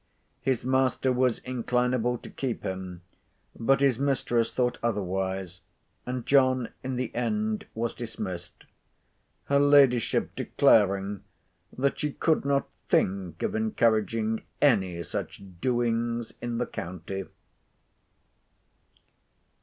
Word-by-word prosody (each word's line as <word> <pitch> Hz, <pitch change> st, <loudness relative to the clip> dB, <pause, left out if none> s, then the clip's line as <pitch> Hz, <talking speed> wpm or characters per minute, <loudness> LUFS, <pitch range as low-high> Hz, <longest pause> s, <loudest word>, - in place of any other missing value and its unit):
His 130 Hz, -3 st, 0 dB
master 130 Hz, 0 st, +2 dB
was 125 Hz, -1 st, +2 dB
inclinable 125 Hz, -1 st, 0 dB
to -, -, -8 dB
keep 130 Hz, -4 st, -3 dB
him, 95 Hz, -2 st, -5 dB, 0.5 s
but 135 Hz, +4 st, +2 dB
his 135 Hz, -4 st, +3 dB
mistress 120 Hz, -4 st, +1 dB
thought 125 Hz, -1 st, 0 dB
otherwise; 95 Hz, -4 st, -2 dB, 0.5 s
and 125 Hz, -1 st, -3 dB
John 130 Hz, -3 st, +3 dB
in 130 Hz, 0 st, -3 dB
the 125 Hz, -1 st, -3 dB
end 215 Hz, -, -1 dB
was 115 Hz, +1 st, -1 dB
dismissed, 100 Hz, -7 st, -6 dB, 0.8 s
her 140 Hz, 0 st, +3 dB
ladyship 140 Hz, -4 st, +4 dB
declaring 100 Hz, -2 st, +3 dB, 0.5 s
that 140 Hz, +2 st, 0 dB
she 150 Hz, -1 st, -1 dB
"could 160 Hz, -4 st, +1 dB
not 140 Hz, 0 st, +1 dB, 0.2 s
think 95 Hz, -2 st, 0 dB
of 220 Hz, -2 st, 0 dB
encouraging 115 Hz, -, +1 dB, 0.2 s
any 95 Hz, -11 st, +2 dB
such -, -, -5 dB, 0.2 s
doings 120 Hz, -2 st, 0 dB
in 120 Hz, -1 st, -3 dB
the 125 Hz, -, 0 dB
county." 95 Hz, +2 st, -6 dB
120 Hz, 105 wpm, -27 LUFS, 100-130 Hz, 0.8 s, ladyship